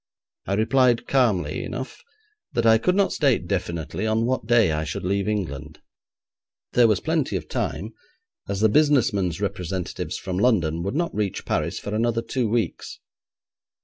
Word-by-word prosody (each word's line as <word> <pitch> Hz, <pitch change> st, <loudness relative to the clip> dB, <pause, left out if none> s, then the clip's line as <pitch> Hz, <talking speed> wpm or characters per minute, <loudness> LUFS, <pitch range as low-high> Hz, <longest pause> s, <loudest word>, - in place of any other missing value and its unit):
I 100 Hz, -, 0 dB
replied 120 Hz, +2 st, +3 dB
calmly 100 Hz, -, +1 dB
enough 130 Hz, +1 st, -6 dB, 0.5 s
that 120 Hz, -, 0 dB
I 110 Hz, 0 st, +6 dB
could 180 Hz, +9 st, +1 dB
not 200 Hz, -1 st, +2 dB
state 135 Hz, -, +2 dB
definitely 85 Hz, 0 st, -3 dB
on 110 Hz, +1 st, +1 dB
what 125 Hz, -3 st, -1 dB
day 115 Hz, -7 st, +4 dB
I 75 Hz, 0 st, -1 dB
should 75 Hz, -, -5 dB
leave 100 Hz, +2 st, 0 dB
England. 80 Hz, -8 st, -4 dB, 0.9 s
There 120 Hz, -1 st, +6 dB
was 105 Hz, -3 st, +2 dB
plenty 160 Hz, -3 st, -1 dB
of -, -, -4 dB
time, -, -, -3 dB, 0.6 s
as 100 Hz, 0 st, -2 dB
the 110 Hz, -, +5 dB
business 140 Hz, -2 st, +3 dB
men's 90 Hz, -4 st, -1 dB
representatives 95 Hz, -3 st, -3 dB
from 90 Hz, 0 st, -4 dB
London 85 Hz, -9 st, +2 dB
would 100 Hz, +8 st, -3 dB
not 170 Hz, +2 st, -1 dB
reach 105 Hz, -2 st, -2 dB
Paris -, -, -1 dB
for 105 Hz, -, -5 dB
another 115 Hz, +1 st, 0 dB
two 120 Hz, -1 st, -1 dB
weeks. 115 Hz, 0 st, -2 dB
110 Hz, 160 wpm, -24 LUFS, 90-120 Hz, 0.9 s, I